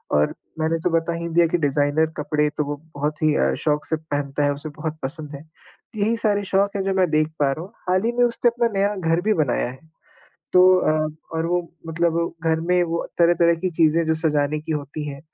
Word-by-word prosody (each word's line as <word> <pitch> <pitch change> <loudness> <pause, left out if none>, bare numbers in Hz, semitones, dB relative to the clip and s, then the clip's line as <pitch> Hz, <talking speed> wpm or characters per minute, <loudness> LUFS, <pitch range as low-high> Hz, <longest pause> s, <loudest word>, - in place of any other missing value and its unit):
और 75 0 +2 0.3
मैंने 160 +1 +1
तो - - +2
बता 165 0 0
ही 170 0 -4
दिया 170 +1 +4
कि - - +2
डिज़ाइनर 145 0 +2
कपड़े 150 0 0
तो 150 - +1
वो 145 +1 -3 0.2
बहुत 150 +1 -3
ही 155 -1 +4
अ, - - +2
शौक 150 -1 0
से 160 - 0
पहनता 145 -2 -3
है, 145 0 +2
उसे 145 +2 -7
बहुत 155 +1 -5
पसंद 150 +1 -5
है। 140 - -10 0.5
यही 220 +3 +1
सारे 205 -3 +1
शौक 200 +1 +1
हैं, 195 - -1
जो 195 0 0
मैं 185 -2 +2
देख 155 0 +3
पा 140 -2 +3
रहा 155 - -4
हूँ। 195 - -16 0.2
हाल 185 +2 +2
ही 235 - +2
में 245 - +4
उसने 240 0 +2
अपना 235 0 0
नया 200 +1 +1
घर 165 -2 0
भी 215 +3 +2
बनाया 145 -8 0
है, 130 +1 -11 0.7
तो 180 - +7 0.2
अ, 155 -1 +1 0.3
और 160 +1 0
वो 175 +1 +1 0.3
मतलब 170 0 0
घर 160 0 +2
में 180 +2 +2
वो 170 0 -2
तरह-तरह 170 0 +4
की 185 - +1
चीज़ें 165 0 +2
जो 160 - +2
सजाने 150 -2 0
की 160 +1 -4
होती 150 0 -4
हैं, 140 -1 -7
160 Hz, 225 wpm, -22 LUFS, 150-175 Hz, 0.7 s, तो